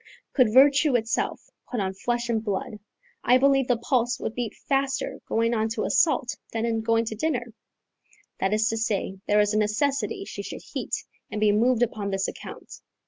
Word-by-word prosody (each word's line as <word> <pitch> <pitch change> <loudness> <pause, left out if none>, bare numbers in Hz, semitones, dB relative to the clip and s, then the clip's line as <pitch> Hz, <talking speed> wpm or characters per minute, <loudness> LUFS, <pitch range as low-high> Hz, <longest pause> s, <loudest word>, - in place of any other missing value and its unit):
Could 250 -6 +4
virtue 280 +2 +5
itself 225 -1 -1 0.2
put 245 - -2
on 190 -1 -1
flesh 240 +4 -2
and 225 -2 0
blood, 210 0 -3 0.4
I 250 - +5
believe 270 -1 +3
the 245 - +2
pulse 245 0 0
would - - -3
beat 240 -3 -4
faster 270 -1 0
going 230 +1 +1
on 220 -1 0
to 215 - -1
assault 305 -6 +2 0.2
than 225 0 -1
in 225 -1 0
going 230 +1 +2
to 220 - -4
dinner: 245 -3 -2 0.9
that 190 - +1
is 215 +1 +2
to 225 - -1
say, 200 -3 -2
there 210 0 +4
is 210 0 +1
a 215 - +2
necessity 280 - 0
she - - -6
should - - -8
heat - - -4 0.2
and 210 - -4
be 210 -1 +4
moved 235 +3 +3
upon 215 -3 -2
this 195 0 -1
account. - - -9
230 Hz, 190 wpm, -25 LUFS, 215-255 Hz, 0.9 s, virtue